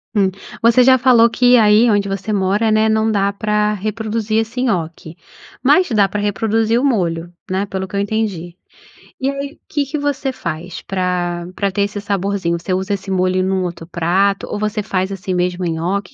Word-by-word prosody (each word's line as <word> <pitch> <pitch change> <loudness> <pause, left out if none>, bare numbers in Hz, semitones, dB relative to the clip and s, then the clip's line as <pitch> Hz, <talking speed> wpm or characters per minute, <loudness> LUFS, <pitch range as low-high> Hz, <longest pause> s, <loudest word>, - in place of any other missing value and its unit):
Hum. 195 -2 +3 0.3
Você 235 +2 +6
já 260 +1 +6
falou 240 -2 +5
que 245 +1 +4
aí 215 +1 +5
onde 200 -1 +1
você 195 +2 -3
mora, 205 +3 +1
né, 215 0 +3
não 220 0 +2
dá 200 -1 +1
pra 210 +1 0
reproduzir 215 +1 -2
esse 225 +3 -3
nhoque. 165 -7 -3 0.5
Mas 365 -3 +4
dá 205 -3 +3
pra 210 - -3
reproduzir 225 +3 +1
o - - 0
molho, 175 -9 0 0.2
né. 190 +2 -1
Pelo 190 -1 -4
que 200 - -8
eu - - +1
entendi. 200 -5 -2 0.6
E 265 - 0
aí, 280 +2 -6
que 290 -2 0
que 290 +3 -4
você 285 -2 -1
faz 170 -4 -6
pra 180 -2 -2
pra 200 -1 0
ter 200 - 0
esse 205 0 -2
saborzinho? 195 -3 -1
Você 185 - -4
usa 190 +2 -1
esse 195 0 -6
molho 185 0 +1
num 190 0 0
outro 170 -2 -6
prato, 185 +4 +1
ou - - -4
você 210 0 -2
faz 190 -2 -2
assim 190 -1 -4
mesmo 180 0 -1
nhoque? 175 +6 -2
200 Hz, 190 wpm, -18 LUFS, 185-220 Hz, 0.6 s, Você